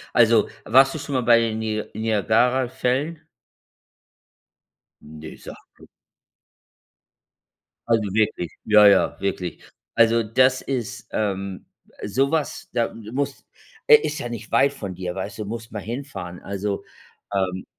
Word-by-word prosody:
Also 115 -2 +5 0.2
warst 135 +5 +5
du - - -3
schon 145 -1 -5
mal 130 - +2
bei 120 0 +6
den 115 -1 -1
Ni 110 -1 -2
Niagarafällen? 125 - +1 1.8
Ne, 80 +1 -10
sag - - -10 0.2
blo - - -17 2.0
Also 115 -1 +3
wirklich, 105 -6 0
ja, 105 -1 +7
ja, 100 -1 +4
wirklich. 90 -3 -3 0.3
Also 115 0 +4
das 130 +4 +3
ist, 120 -5 -4
ähm 100 -3 -3 0.4
so 135 +7 +1
was, 160 -2 -2
da 120 -1 -1
muss 130 +6 -4 0.4
äh, 455 - +10
ist 150 - -3
ja 120 - -4
nicht 115 -2 -8
weit 135 +4 +4
von 100 -9 -6
dir, 90 0 -5
weißt 100 +3 -5
du? 105 - -3
Musst 115 +2 -7
mal 105 - -4
hinfahren. 105 -8 -6
Also, 100 +1 -4 0.5
ähm 95 -1 -1
110 Hz, 130 wpm, -23 LUFS, 100-125 Hz, 2.0 s, äh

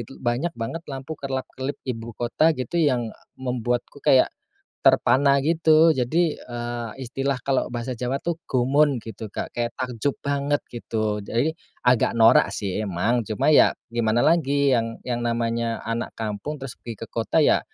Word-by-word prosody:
itu - - -12
banyak 130 +8 -2
banget 115 +9 -4
lampu 135 +2 -6
kerlap-kerlip 135 -1 -4
ibukota 120 +6 0
gitu, 130 +7 -1
yang, 125 -7 +1
e - - -21 0.2
membuatku 125 +1 -3
kayak 130 -1 +4 0.5
terpana 140 +1 +4
gitu. 160 0 +5
Jadi, 155 +5 +1
eee, 120 -1 -5
istilah 135 +3 -1
kalau 135 -2 0
bahasa 120 +2 -3
Jawa 125 +2 -1
tuh 170 -1 -2
gumun 135 +3 +3
gitu, 110 -1 -7
Kak, - - -5
kayak 120 0 -2
takjub 125 +2 -2
banget 140 +1 0
gitu. 110 -3 -2
Jadi 120 +9 0 0.3
agak 125 -1 +3
norak 115 0 +6
sih 100 0 -2
emang, 110 +4 0
cuma 110 +7 +1
ya - - +6 0.2
gimana 120 0 +2
lagi, 140 -4 +3
yang 115 -2 0
yang 120 -1 -2
namanya 115 0 -1
anak 115 +1 -3
kampung 110 +7 -4
terus 135 -3 -7
pergi 115 - -7
ke - - -12
kota 115 +8 +1
ya - - +4
125 Hz, 155 wpm, -24 LUFS, 115-140 Hz, 0.5 s, norak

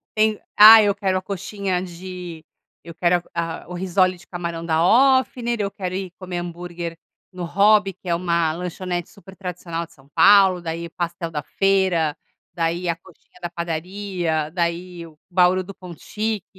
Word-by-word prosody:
tem, 215 -1 +2 0.2
ah, 220 +1 +11
eu 205 -1 +2
quero 190 -2 0
a 185 - -3
coxinha 195 -1 -3
de 180 -2 -8 0.4
eu 170 - -10
quero 175 0 +2
a 165 -1 -4
o 180 - -8
risole 185 0 +1
de 185 - -18
camarão 170 -2 -5
da 160 0 +2 0.4
Ofner, 240 -2 -4
eu 200 -1 -2
quero 185 -1 -5
ir 190 -2 -4
comer 180 -2 -5
hambúrguer 175 -1 -6 0.3
no 180 -2 -7
Hobby, 200 +2 +3
que 185 0 -16
é 170 - +2
uma 170 -2 0
lanchonete 175 0 -4
super 190 -1 -15
tradicional 175 -2 -5
de - - -22
São 135 -1 -22
Paulo. 195 -3 +6
Daí 165 0 -4
o 170 - -10
pastel 170 -1 -4
da 150 -2 -3
feira, 190 -6 +1 0.4
daí 170 +1 -1
a 170 - +1
coxinha 180 +1 -21
da 175 - -4
padaria, 170 -1 -3
daí 170 0 -3
o 155 - -18
bauru 180 +1 +3
do 200 +2 -10
Ponto 180 -3 -11
Chic. 215 -2 -3
180 Hz, 175 wpm, -22 LUFS, 170-190 Hz, 0.4 s, ah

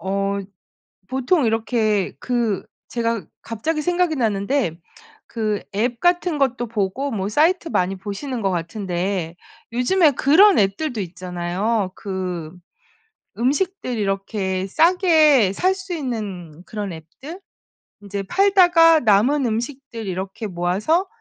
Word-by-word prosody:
어 195 +2 -1 0.7
보통 265 +3 +1
이렇게 220 -3 0
그 235 -6 -1 0.2
제가 230 -5 -2 0.2
갑자기 305 +8 -3
생각이 355 -1 +1
났는데 220 - 0 0.5
그 215 -3 -2
앱 235 +3 0
같은 350 -2 +2
것도 255 -3 0
보고 225 +6 -2
뭐 195 -3 -2
사이트 330 - +2
많이 185 -3 0
보시는 220 +6 -5
거 195 - +1
같은데 175 0 -3 0.4
요즘에 300 +6 +3
그런 340 - +5
앱들도 210 +5 0
있잖아요. 185 +3 -2
그 180 -5 -5 0.9
음식들 280 - -1
이렇게 195 -1 -2
싸게 315 - +4
살 370 - +2
수 380 -2 -6
있는 200 - -5
그런 205 -2 -5
앱들 270 - -10 0.6
인제 200 -1 -5
팔다가 350 - +5
남은 245 +6 +3
음식들 235 -1 -4
이렇게 190 +4 -4
모아서 195 - 0
225 Hz, 240 characters per minute, -21 LUFS, 195-295 Hz, 0.9 s, 그런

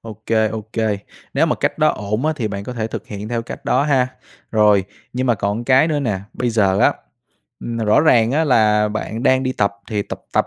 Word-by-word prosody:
ô 110 -1 -11
kê, 110 -1 +2
ô 110 +1 -4
kê. 110 -3 0 0.4
Nếu - - +3
mà - - +1
cách - - -2
đó - - +4
ổn 105 +6 -2
á, 155 - +2
thì 115 -6 -2
bạn 100 -1 -5
có 125 - -5
thể 115 -3 -3
thực 110 - -7
hiện 105 0 -7
theo 120 0 -2
cách 115 - -9
đó 130 - +2
ha. 135 -4 +2 0.4
Rồi, 105 -3 +4 0.3
nhưng 130 +1 -1
mà 120 - +3
còn 100 +3 -2
cái 135 +5 +4
nữa 150 -2 0
nè, 105 -8 -1
bây 125 -1 -1
giờ 100 -4 +2
á, - - +4 0.7
ừm, 115 - -5
rõ 110 -1 +3
ràng 120 -7 +4
á, 160 +3 +2
là 105 -6 +3
bạn 110 +2 -4
đang 130 -1 +3
đi 130 -1 -1
tập 100 -5 0 0.2
thì 105 -2 0
tập - - -8
tập, - - +2
110 Hz, 240 wpm, -19 LUFS, 105-125 Hz, 0.7 s, đó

